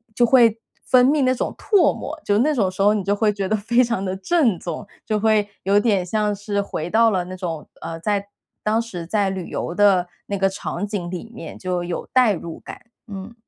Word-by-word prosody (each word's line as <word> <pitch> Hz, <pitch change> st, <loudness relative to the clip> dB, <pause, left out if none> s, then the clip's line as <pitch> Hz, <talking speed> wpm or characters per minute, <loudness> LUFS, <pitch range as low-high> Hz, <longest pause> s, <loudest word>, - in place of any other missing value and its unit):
就 240 Hz, -, +4 dB
会 235 Hz, -3 st, +5 dB, 0.3 s
分 250 Hz, -1 st, +5 dB
泌 290 Hz, +3 st, +3 dB
那 255 Hz, 0 st, +2 dB
种 -, -, -3 dB
唾 405 Hz, -5 st, +3 dB
沫。 -, -, -6 dB
就 205 Hz, -, +2 dB
那 290 Hz, +8 st, +3 dB
种 200 Hz, -7 st, +1 dB
时 185 Hz, -, -5 dB
候 205 Hz, +1 st, +5 dB
你 210 Hz, -2 st, -1 dB
就 200 Hz, +2 st, +1 dB
会 210 Hz, 0 st, +2 dB
觉 195 Hz, -2 st, -3 dB
得 215 Hz, -, +2 dB
非 235 Hz, +4 st, +2 dB
常 235 Hz, -5 st, -1 dB
的 185 Hz, 0 st, -2 dB
正 230 Hz, -, +2 dB
宗， 180 Hz, +5 st, -6 dB, 0.2 s
就 215 Hz, -1 st, 0 dB
会 215 Hz, -1 st, +2 dB
有 195 Hz, +2 st, +3 dB
点 205 Hz, -4 st, +2 dB
像 210 Hz, +2 st, 0 dB
是 205 Hz, 0 st, -2 dB
回 170 Hz, -4 st, -4 dB
到 225 Hz, +3 st, +4 dB
了 185 Hz, -3 st, 0 dB
那 185 Hz, +1 st, -7 dB
种， 170 Hz, -4 st, -5 dB
呃， 165 Hz, 0 st, -6 dB
在 200 Hz, +3 st, -1 dB, 0.4 s
当 215 Hz, +1 st, +2 dB
时 185 Hz, -8 st, -7 dB
在 200 Hz, +1 st, +1 dB
旅 190 Hz, -2 st, -5 dB
游 -, -, -3 dB
的 190 Hz, -2 st, +4 dB, 0.2 s
那 200 Hz, -, -2 dB
个 195 Hz, 0 st, +3 dB
场 190 Hz, 0 st, -4 dB
景 200 Hz, -4 st, -4 dB
里 185 Hz, +5 st, -7 dB
面， 235 Hz, -, -9 dB
就 180 Hz, -1 st, -2 dB
有 175 Hz, 0 st, -4 dB
代 250 Hz, -5 st, +5 dB
入 170 Hz, -2 st, -7 dB
感， -, -, -11 dB, 0.2 s
嗯。 200 Hz, +1 st, -8 dB
205 Hz, 240 characters per minute, -22 LUFS, 185-225 Hz, 0.4 s, 会